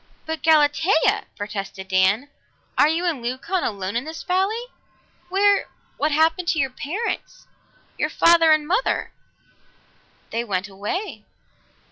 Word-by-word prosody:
"But 320 0 -4
Galatea!" 315 +2 +3
protested 195 -2 -6
Dan. 190 +7 +2 0.5
"Are 290 - +5
you 330 +3 0
and 320 -8 -1
Leucon 260 +10 -2
alone 200 -1 -3
in 240 - 0
this 315 +2 -7
valley? 390 +6 0 0.7
Where 400 +2 +3 0.3
what 300 +2 0
happened 320 +3 +2
to 325 - +1
your 270 -2 0
parents 390 - -4 0.5
your - - +1
father 335 -1 +5
and 305 -1 +3
mother?" 395 +9 0 1.2
"They 230 +1 -1
went 195 -4 -2
away. 215 - -5
310 Hz, 125 wpm, -22 LUFS, 220-350 Hz, 1.2 s, Are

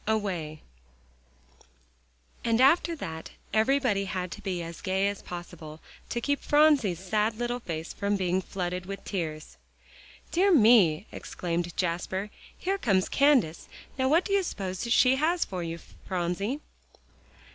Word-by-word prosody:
XXIV 220 - +3
AWAY 170 -8 -4 1.8
And 230 0 +2
after 330 +5 +4
that 160 - -6 0.2
everybody 220 -2 +2
had 185 -2 -3
to 210 - -8
be 185 -4 -3
as 165 0 -8
gay 190 0 +1
as 200 -1 -3
possible, 165 -3 -9 0.3
to 235 - -1
keep 285 +4 -1
Phronsie's 290 - +4
sad 210 +4 0
little 240 +1 -2
face 165 -7 -5
from 200 0 -1
being 185 -1 0
flooded 180 -1 -4
with 195 0 -6
tears. 155 - -4 0.7
"Dear 390 +3 +3
me!" 215 - +5
exclaimed 175 -1 -4
Jasper, 185 +3 -2 0.3
"here 390 +2 -1
comes 195 - +2
Candace! 270 - +3 0.3
Now 260 0 +2
what 330 +5 +4
do 395 - -1
you 400 - +4
suppose 195 - -4
she 255 +2 +5
has 330 +4 +1
for 185 -2 -5
you, 165 0 -4 0.3
Phronsie?" 190 - -2
195 Hz, 140 wpm, -28 LUFS, 175-250 Hz, 1.8 s, me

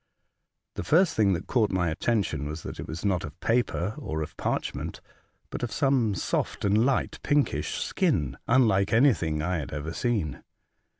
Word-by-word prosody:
The - - -4
first 170 - +3
thing 100 -3 +3
that 85 - -3
caught 115 -5 +2
my 90 -3 0
attention 95 - -1
was 75 +2 -6
that - - -7
it - - -5
was 80 +6 -6
not 95 -4 +1
of - - -8
paper 115 -5 0
or 80 - -3
of 80 - -9
parch - - -2
ment, - - -6 0.5
but - - -5
of 120 -3 -2
some 130 -7 +2
soft - - -2
and 105 +3 +4
light 135 - 0
pinkish 145 -1 +1
skin, 90 - 0
unlike 110 -6 +3
anything 110 - +3
that 75 +2 -2
I 90 - +1
had 70 - -6
ever 75 +2 -4
seen. 110 -10 -1
100 Hz, 180 wpm, -27 LUFS, 80-120 Hz, 0.5 s, and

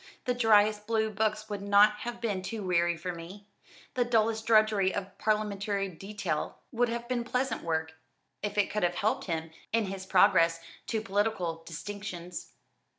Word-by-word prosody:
The 250 - +1
driest 210 -3 +4
blue 220 -1 +1
books 215 0 -1
would 205 -2 -4
not 205 +1 +5
have 235 +2 -5
been 210 -5 -1
too 215 +2 -5
weary 175 -2 +2
for 180 +2 -4
me 175 +5 -10 0.5
the 250 - +2
dullest 225 -2 +1
drudgery 215 -4 +4
of 195 -1 -5
parliamentary 205 -2 0
detail 185 -3 -4
would 240 0 +1
have 235 0 -4
been 245 -1 -1
pleasant 255 +2 -1
work, 160 -1 -2 0.5
if 210 0 -3
it 205 - +2
could 210 - -1
have 175 0 +1
helped 210 +4 0
him 160 -2 -3 0.2
in 225 -1 +2
his 190 0 -6
progress 180 -4 +5 0.3
to 220 - -1
political 195 -5 -1
distinctions." 180 0 -7
205 Hz, 160 wpm, -30 LUFS, 185-220 Hz, 0.5 s, not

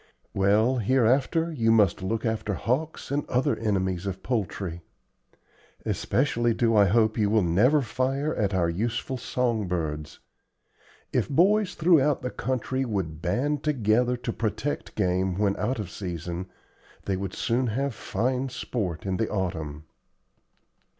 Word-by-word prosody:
"Well, 105 +6 +3
hereafter 130 - +2
you 115 -6 +2
must 105 -7 +4
look 110 +5 -2
after 110 -2 -1
hawks, 135 - -2
and 145 +1 0
other 125 +1 +2
enemies 95 -4 -1
of 95 -1 -5
poultry. 95 -7 -2 1.0
Especially 120 -1 +1
do 115 -2 +2
I 100 -1 +6
hope 110 +3 +2
you 105 -1 +3
will 110 -1 +3
never 120 - +3
fire 130 +5 -1
at 100 -2 0
our 90 -3 +2
useful 115 +9 -2
song 120 -4 -1
birds. 75 -4 -3 1.0
If - - +1
boys 195 +7 +3
throughout 155 -5 +3
the 125 - -2
country 130 +1 -2
would 95 -10 -3
band 135 - 0
together 125 -3 +2
to 120 -1 -4
protect 110 +5 -3
game 95 -2 0
when 100 -1 +2
out 120 +4 -1
of 100 -4 -5
season, 90 -1 -5 0.6
they 95 - 0
would 95 0 -4
soon 125 +2 0
have 135 +4 -1
fine 130 +4 -1
sport 105 -9 -4
in 95 -1 -1
the 110 - -1
autumn." 80 -6 -3
110 Hz, 140 wpm, -26 LUFS, 95-130 Hz, 1.0 s, I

